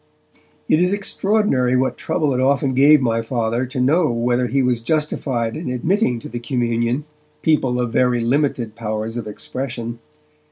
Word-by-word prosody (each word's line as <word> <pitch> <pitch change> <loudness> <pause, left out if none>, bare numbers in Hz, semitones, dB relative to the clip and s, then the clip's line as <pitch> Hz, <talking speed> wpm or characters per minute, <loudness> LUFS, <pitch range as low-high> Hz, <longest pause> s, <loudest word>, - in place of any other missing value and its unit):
It 155 - +3
is 180 +2 +2
extraordinary 200 - +1
what 130 +1 0
trouble 150 -5 -1
it 125 - -1
often 135 0 +2
gave 145 +3 +6
my 115 -2 +1
Father 115 +1 -1
to 130 +1 -5
know 150 +6 +3
whether 120 +1 0
he 135 +2 +1
was 125 -2 +1
justified 130 -4 -1
in 160 -4 -4
admitting 125 - 0
to - - -7
the 120 - -5
communion 120 +2 -1 0.4
people 135 -6 +2
of 120 -2 -2
very 125 -1 +2
limited 125 -2 0
powers 110 0 -4
of 120 -3 -4
expression. 120 +1 -5
125 Hz, 160 wpm, -20 LUFS, 120-140 Hz, 0.4 s, gave